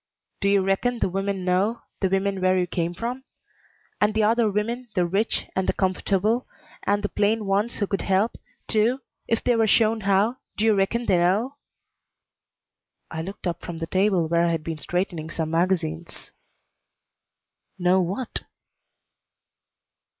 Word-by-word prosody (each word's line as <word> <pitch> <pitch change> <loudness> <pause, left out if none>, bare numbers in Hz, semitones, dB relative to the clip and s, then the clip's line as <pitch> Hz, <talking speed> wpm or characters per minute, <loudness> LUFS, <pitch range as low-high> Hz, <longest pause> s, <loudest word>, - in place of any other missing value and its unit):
"Do 200 - +2
you 200 -1 +4
reckon 195 +6 +1
the 210 - 0
women 195 0 -2
know, 195 +6 +1 0.2
the 190 - +1
women 195 0 0
where 185 0 +3
you 180 - +2
come 175 0 -2
from? 245 +6 -4 0.8
And 210 +1 +3
the 220 - +3
other 225 +1 +3
women, 230 +4 -2
the 180 -2 +3
rich, 195 +6 0
and 190 0 0
the - - +2
comfortable, 200 +5 0 0.3
and 205 +1 0
the 205 - 0
plain 215 +1 +1
ones 200 +4 0
who 205 - +1
could 195 0 -2
help, 195 +4 +1 0.3
too, 235 +4 +2 0.3
if 230 - 0
they 245 - +3
were 225 -1 +3
shown 220 +1 +3
how 200 +5 +2 0.2
do 215 - +1
you 220 - +5
reckon 210 +4 +1
they 185 - +3
know?" 210 +11 +1 1.5
I 160 - -3
looked 195 +5 -8
up 175 -1 -2
from 170 -2 -6
the 165 - -3
table 185 -1 +2
where 170 +1 +2
I - - +2
had 165 -2 -1
been 160 -1 -4
straightening 175 -2 -2
some 160 -1 -3
magazines. 165 -1 -1 1.5
"Know 185 +1 +3
what?" 195 +8 -3
195 Hz, 160 wpm, -24 LUFS, 180-220 Hz, 1.5 s, you